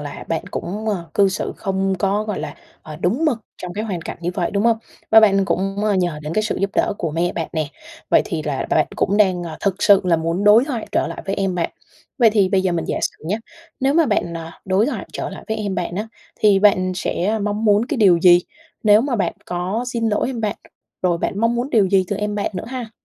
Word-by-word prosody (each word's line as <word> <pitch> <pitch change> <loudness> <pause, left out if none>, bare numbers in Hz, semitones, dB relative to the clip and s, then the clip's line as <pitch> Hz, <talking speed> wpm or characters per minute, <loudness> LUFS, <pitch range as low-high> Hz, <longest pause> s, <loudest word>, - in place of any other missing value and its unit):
là 145 -1 -7
bạn 165 - -2
cũng, 210 +5 -4
ờ, 185 -5 -2
cư 200 -1 +4
xử 190 - -3
không 195 -1 -1
có, 205 +2 0
gọi 210 -2 -3
là, - - -5 0.3
ờ, 155 -1 -9
đúng 220 - 0
mực 275 -7 +2 0.2
trong 180 -1 -5
cái 215 +3 -3
hoàn 180 -6 -4
cảnh - - -6
như 175 +1 -2
vậy, 175 -3 -1
đúng 200 0 0
hông? 230 -1 +3 0.3
Và 220 0 +9
bạn 195 -2 +4
cũng, 195 +2 -1
ơ, 210 - +2
nhờ 175 -5 0
đến 150 - -4
cái 215 - +2
sự 220 - -2
giúp 200 0 0
đỡ - - +2
của 165 - -2
mẹ 170 +3 0
bạn 165 -2 -3
nè, 155 -3 -1 0.4
vậy - - +5
thì 155 -2 -3
là 145 -3 -2
bạn 155 - +3
cũng 200 - +1
đang, 185 -4 +3
à, 155 -2 -7
thực 195 -2 +1
sự 200 -2 +6
là 170 -2 +3
muốn 165 +4 -1
đối 215 +5 +7
thoại 245 -7 -4
trở - - +1
lại - - -6
với 195 - -1
em 195 -2 -1
bạn. 170 -2 -1 0.5
Vậy 230 -3 +6
thì 200 -3 +3
bây 190 -1 +2
giờ 185 -2 +1
mình 165 - -1
giả - - -2
sử - - -3
nhá, 205 +5 0 0.4
nếu 270 +2 +2
mà 330 -1 +4
bạn, 175 -6 0
à, 165 0 -9
đối 195 +4 +2
thoại 295 - -4
trở - - -4
lại - - -10
với 220 - -1
em 205 -3 -3
bạn 175 0 -3
á, 215 +2 -3 0.3
thì 205 -2 +5
bạn 185 -2 +3
sẽ 190 +3 -1
mong 210 +2 -2
muốn 210 +2 +4
cái 300 - -2
điều 190 -6 +5
gì 175 -1 +7 0.4
nếu 210 0 +6
mà 250 -1 -1
bạn 200 - 0
có 185 +7 -2
xin 230 -2 0
lỗi 210 - 0
em 240 -4 -4
bạn? 210 -2 -1 0.5
Rồi 175 -2 +2
bạn 200 - -2
mong 230 +1 +2
muốn 245 +4 -2
điều 210 -4 +4
gì 190 -1 +3
từ 205 - -1
em 210 0 -2
bạn 205 - -1
nữa 180 - -4
ha? 245 -3 -6
195 Hz, 260 wpm, -20 LUFS, 175-215 Hz, 0.5 s, Và